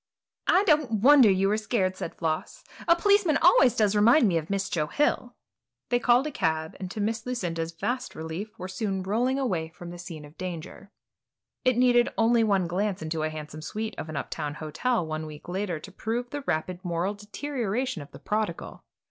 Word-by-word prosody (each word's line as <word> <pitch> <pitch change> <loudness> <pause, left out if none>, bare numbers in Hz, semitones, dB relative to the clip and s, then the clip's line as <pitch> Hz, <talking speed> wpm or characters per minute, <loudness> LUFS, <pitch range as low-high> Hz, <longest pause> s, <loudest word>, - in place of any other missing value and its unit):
"I 370 +3 +5
don't 305 -8 +3
wonder 275 -4 +8
you 190 0 +3
were 210 +2 +2
scared," 215 -4 0
said 175 - -6
Floss; 165 - -3 0.2
"a 335 - +7
policeman 380 -4 +3
always 300 -8 +5
does 210 -2 +2
remind 230 +5 +6
me 170 -4 +2
of 155 - -9
Miss 195 0 -1
Joe 155 -3 -1
Hill." 295 - 0 0.5
They 245 - +2
called 245 +3 +4
a 305 - -3
cab 160 - -1
and, 185 -2 -5
to 210 - -6
Miss 220 +2 -1
Lucinda's 170 -10 -3
vast 245 +10 -3
relief, 160 +7 -6
were 185 - -6
soon 190 0 -2
rolling 240 +7 +1
away 185 -12 -1
from 170 +1 -10
the 175 - -9
scene 165 -4 -8
of 150 +2 -17
danger. 180 +2 -7 0.7
It 255 -2 +3
needed 245 -1 +4
only 230 +1 +4
one 200 -4 +2
glance 185 +1 -1
into 160 0 -2
a 155 - 0
handsome 155 0 -8
suite 215 +6 -4
of 155 - -6
an 155 - -4
up - - -5
town 145 0 -3
hotel 170 +8 -1
one 155 0 -4
week 150 -1 -11
later 180 -2 -2
to 195 - -11
prove 235 +5 -3
the 290 - -4
rapid 175 +4 -2
moral 175 +2 -1
deterioration 225 - -3
of 145 - -11
the - - -12
prodigal. 215 0 -3
200 Hz, 200 wpm, -27 LUFS, 165-240 Hz, 0.7 s, wonder